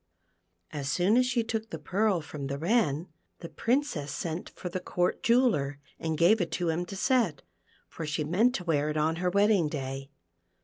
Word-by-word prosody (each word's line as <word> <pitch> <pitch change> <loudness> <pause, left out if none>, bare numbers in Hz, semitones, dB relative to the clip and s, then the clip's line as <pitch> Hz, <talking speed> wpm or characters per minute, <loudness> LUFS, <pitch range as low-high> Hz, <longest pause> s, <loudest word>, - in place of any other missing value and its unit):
As 140 -2 -4
soon 190 +5 +3
as 250 0 +4
she 240 -2 +1
took 225 0 -3
the 160 - -5
pearl 190 +4 +1
from 145 -2 -6
the 140 +1 -3
Wren, 170 - +1 0.3
the 170 - -7
Princess 230 - -1
sent 165 +1 -4
for - - -8
the 180 +1 -3
Court 180 0 -1
jeweller, 230 - +2 0.2
and 160 -1 -2
gave 185 +7 +5
it*to 175 0 -1
him 170 +2 -1
to 195 - -7
set, 220 - +1 0.4
for - - -7
she 150 +1 -1
meant 210 - +2
to 180 - -3
wear 150 -3 +1
it 155 - -2
on 160 +2 +1
her 180 +1 0
wedding 200 -4 +3
day. 135 -2 -5
175 Hz, 185 wpm, -29 LUFS, 150-215 Hz, 0.4 s, gave